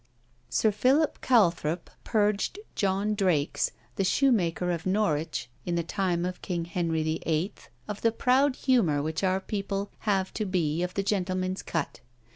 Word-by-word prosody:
Sir 220 Hz, -, +2 dB
Philip 270 Hz, +9 st, +2 dB
Calthrop 175 Hz, -8 st, +2 dB
purged 210 Hz, -, +1 dB, 0.2 s
John 200 Hz, +2 st, +1 dB
Drakes, 180 Hz, -8 st, +1 dB, 0.3 s
the 195 Hz, -, +2 dB
shoemaker 185 Hz, -6 st, +2 dB
of 170 Hz, 0 st, -3 dB
Norwich, 160 Hz, -, 0 dB, 0.2 s
in 175 Hz, -, -2 dB
the 170 Hz, -, 0 dB
time 175 Hz, 0 st, -1 dB
of 180 Hz, 0 st, -4 dB
King 170 Hz, -3 st, -2 dB
Henry 165 Hz, -2 st, -1 dB
VIII. 160 Hz, +4 st, -1 dB, 0.3 s
of 210 Hz, -, -5 dB
the 230 Hz, -, +3 dB
proud 255 Hz, +4 st, +3 dB
humour 190 Hz, -, +2 dB
which 160 Hz, +4 st, -2 dB
our 190 Hz, 0 st, +2 dB
people 200 Hz, 0 st, -3 dB, 0.2 s
have 190 Hz, -2 st, +1 dB
to 215 Hz, -, -2 dB
be 170 Hz, -4 st, 0 dB
of 180 Hz, 0 st, -3 dB
the 200 Hz, -, 0 dB
gentlemen's 185 Hz, -2 st, -1 dB
cut. 165 Hz, -4 st, -3 dB
185 Hz, 150 wpm, -28 LUFS, 170-210 Hz, 0.3 s, the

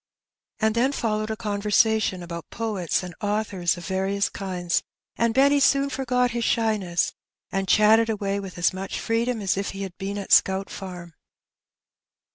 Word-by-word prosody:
And 220 Hz, 0 st, +2 dB
then 250 Hz, +5 st, +2 dB
followed 215 Hz, -4 st, -1 dB
a 220 Hz, -, -2 dB
conversation 210 Hz, -2 st, +1 dB
about 170 Hz, -1 st, -7 dB
poets 205 Hz, -7 st, -2 dB
and 180 Hz, -1 st, -7 dB
authors 205 Hz, -4 st, 0 dB
of 175 Hz, -, -8 dB
various 195 Hz, +2 st, 0 dB
kinds, 180 Hz, -3 st, -2 dB, 0.3 s
and 230 Hz, 0 st, +1 dB
Benny 280 Hz, +4 st, +4 dB
soon 275 Hz, 0 st, +3 dB
forgot 250 Hz, -2 st, +1 dB
his 235 Hz, 0 st, -2 dB
shy 225 Hz, -1 st, +2 dB
ness, 175 Hz, -3 st, -1 dB, 0.4 s
and 195 Hz, 0 st, -1 dB
chatted 220 Hz, +3 st, +5 dB
away 200 Hz, -2 st, -1 dB
with 195 Hz, -2 st, -8 dB
as 175 Hz, +1 st, +2 dB
much 190 Hz, +1 st, -4 dB
freedom 230 Hz, 0 st, -1 dB
as 195 Hz, -1 st, 0 dB
if 195 Hz, -, -2 dB
he 200 Hz, -, -3 dB
had 190 Hz, -2 st, -7 dB
been 200 Hz, +1 st, -3 dB
at 200 Hz, -, -6 dB
Scout 190 Hz, +1 st, +4 dB
Farm. 180 Hz, -3 st, -8 dB
205 Hz, 165 wpm, -24 LUFS, 190-225 Hz, 0.4 s, chatted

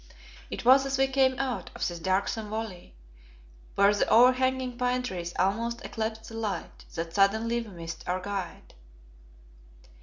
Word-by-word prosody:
It -, -, -6 dB
was 265 Hz, +2 st, +7 dB
as 270 Hz, -1 st, -1 dB
we 270 Hz, -, +4 dB
came 265 Hz, -1 st, +2 dB
out 265 Hz, -2 st, -2 dB
of -, -, -1 dB
this 175 Hz, -1 st, -5 dB
darksome 195 Hz, +4 st, -1 dB
valley, 215 Hz, -, -6 dB, 0.8 s
where 200 Hz, +1 st, +5 dB
the 205 Hz, -, 0 dB
overhanging 255 Hz, +1 st, +4 dB
pine 250 Hz, 0 st, 0 dB
trees 175 Hz, -7 st, -4 dB
almost 230 Hz, +5 st, 0 dB
eclipsed 220 Hz, 0 st, -4 dB
the -, -, -11 dB
light, 215 Hz, -3 st, -4 dB
that 165 Hz, 0 st, -4 dB
suddenly 220 Hz, +5 st, +2 dB
we 230 Hz, -, -9 dB
missed 165 Hz, -3 st, -8 dB
our 180 Hz, +1 st, 0 dB
guide. 190 Hz, -2 st, -6 dB
220 Hz, 150 wpm, -28 LUFS, 190-250 Hz, 0.8 s, was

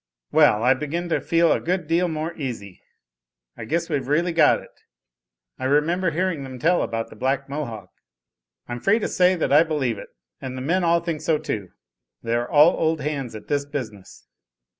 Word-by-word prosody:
"Well, 105 Hz, +2 st, +4 dB
I 130 Hz, +2 st, +5 dB
begin 155 Hz, +6 st, -4 dB
to -, -, 0 dB
feel 165 Hz, -1 st, +2 dB
a -, -, +2 dB
good 180 Hz, 0 st, -2 dB
deal 170 Hz, +3 st, +1 dB
more 160 Hz, 0 st, -3 dB
easy. 120 Hz, -, -6 dB, 0.7 s
I 115 Hz, -, -8 dB
guess 165 Hz, +7 st, -1 dB
we've 145 Hz, -5 st, -2 dB
really 170 Hz, +5 st, +1 dB
got 165 Hz, -, +4 dB
it. -, -, -15 dB, 0.9 s
I -, -, -3 dB
remember 165 Hz, +6 st, +2 dB
hearing 170 Hz, -1 st, -1 dB
them 130 Hz, -1 st, -8 dB
tell 170 Hz, +8 st, +2 dB
about 115 Hz, 0 st, -3 dB
the -, -, -11 dB
Black 135 Hz, +4 st, -1 dB
Mohawk." 115 Hz, -9 st, -6 dB, 0.8 s
"I'm 120 Hz, 0 st, -5 dB
free 200 Hz, -, +3 dB
to 225 Hz, -, -2 dB
say 180 Hz, 0 st, +3 dB
that 165 Hz, -, 0 dB
I 150 Hz, -, +8 dB
believe 145 Hz, -9 st, -1 dB
it, -, -, -10 dB, 0.3 s
and 130 Hz, -1 st, -6 dB
the -, -, -5 dB
men 180 Hz, +6 st, +1 dB
all 170 Hz, 0 st, +3 dB
think 165 Hz, -3 st, -4 dB
so 155 Hz, 0 st, +1 dB
too. 100 Hz, -9 st, -4 dB, 0.5 s
They 115 Hz, -, -2 dB
are 120 Hz, +1 st, -1 dB
all 150 Hz, +3 st, +6 dB
old 160 Hz, 0 st, 0 dB
hands 140 Hz, -5 st, -3 dB
at 110 Hz, -, -10 dB
this 145 Hz, -1 st, 0 dB
business." 110 Hz, -10 st, -7 dB
150 Hz, 195 wpm, -23 LUFS, 130-170 Hz, 0.9 s, I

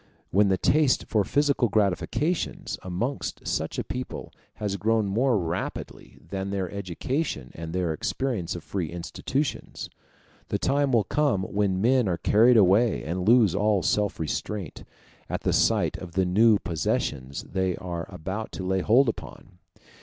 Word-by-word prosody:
When 100 Hz, +2 st, +4 dB
the 95 Hz, -1 st, +2 dB
taste 145 Hz, -, +3 dB
for 105 Hz, -2 st, +2 dB
physical 140 Hz, 0 st, +2 dB
gratifications 110 Hz, -, -1 dB
amongst 95 Hz, +10 st, -4 dB
such -, -, -2 dB
a -, -, -1 dB
people -, -, -6 dB, 0.2 s
has 100 Hz, -2 st, -3 dB
grown 110 Hz, +2 st, +1 dB
more 115 Hz, +5 st, +2 dB
rapidly 85 Hz, -2 st, -5 dB
than 95 Hz, 0 st, -4 dB
their 95 Hz, -3 st, -2 dB
education 100 Hz, -, -3 dB
and 80 Hz, 0 st, -7 dB
their 90 Hz, -2 st, 0 dB
experience 100 Hz, -, -2 dB
of 85 Hz, -, -7 dB
free 90 Hz, -6 st, -3 dB
institutions, 95 Hz, -, -4 dB, 0.6 s
the -, -, -1 dB
time 140 Hz, 0 st, +1 dB
will 115 Hz, -4 st, +4 dB
come 135 Hz, -3 st, +1 dB
when 95 Hz, -1 st, 0 dB
men 125 Hz, -1 st, +3 dB
are 90 Hz, -2 st, 0 dB
carried 115 Hz, +8 st, +5 dB
away, 105 Hz, +3 st, +4 dB
and 90 Hz, +4 st, -3 dB
lose 115 Hz, -7 st, +6 dB
all 100 Hz, -2 st, +2 dB
self 105 Hz, +5 st, 0 dB
restraint, 90 Hz, +4 st, -4 dB, 0.5 s
at -, -, -2 dB
the -, -, 0 dB
sight -, -, +2 dB
of 90 Hz, -2 st, -9 dB
the 95 Hz, +1 st, +2 dB
new 105 Hz, +4 st, +5 dB
possessions 70 Hz, -6 st, -2 dB
they 95 Hz, -2 st, -1 dB
are 85 Hz, -2 st, -5 dB
about 95 Hz, +7 st, -5 dB
to 95 Hz, -, -5 dB
lay 95 Hz, 0 st, +1 dB
hold 125 Hz, +8 st, +4 dB
upon. 90 Hz, -5 st, -6 dB
100 Hz, 155 wpm, -26 LUFS, 90-115 Hz, 0.6 s, lose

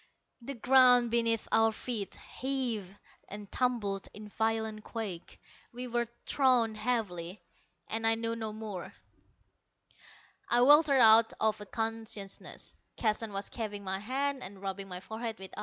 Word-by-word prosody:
The 275 Hz, +4 st, -6 dB
ground 250 Hz, -1 st, +5 dB
beneath 230 Hz, -1 st, +1 dB
our 225 Hz, 0 st, +4 dB
feet 220 Hz, -2 st, -4 dB
heaved 245 Hz, -8 st, -4 dB, 0.3 s
and 205 Hz, 0 st, -8 dB
tumbled 220 Hz, -6 st, 0 dB
in 210 Hz, 0 st, -9 dB
violent 220 Hz, 0 st, -1 dB
quake. 205 Hz, -7 st, -6 dB, 0.3 s
We 245 Hz, +1 st, -6 dB
were 240 Hz, 0 st, -1 dB, 0.2 s
thrown 250 Hz, -5 st, +3 dB
heavily 215 Hz, -6 st, -2 dB, 0.5 s
and 225 Hz, 0 st, 0 dB
I 225 Hz, -, +5 dB
knew 230 Hz, 0 st, -2 dB
no 220 Hz, -1 st, -4 dB
more.... 210 Hz, -4 st, -7 dB, 1.5 s
I 240 Hz, -, +4 dB
weltered 290 Hz, +2 st, +7 dB
out 225 Hz, 0 st, +7 dB
of 215 Hz, -1 st, +1 dB
unconsciousness. 225 Hz, -1 st, -5 dB, 0.2 s
Keston 220 Hz, -1 st, 0 dB
was 200 Hz, 0 st, -4 dB
chafing 210 Hz, -3 st, -5 dB
my 190 Hz, 0 st, -2 dB
hands 270 Hz, +5 st, -1 dB
and 195 Hz, +1 st, -7 dB
rubbing 195 Hz, 0 st, -5 dB
my 180 Hz, -1 st, -6 dB
forehead 220 Hz, +2 st, -5 dB
with 190 Hz, 0 st, -8 dB
ice. -, -, -7 dB
225 Hz, 140 wpm, -31 LUFS, 205-240 Hz, 1.5 s, weltered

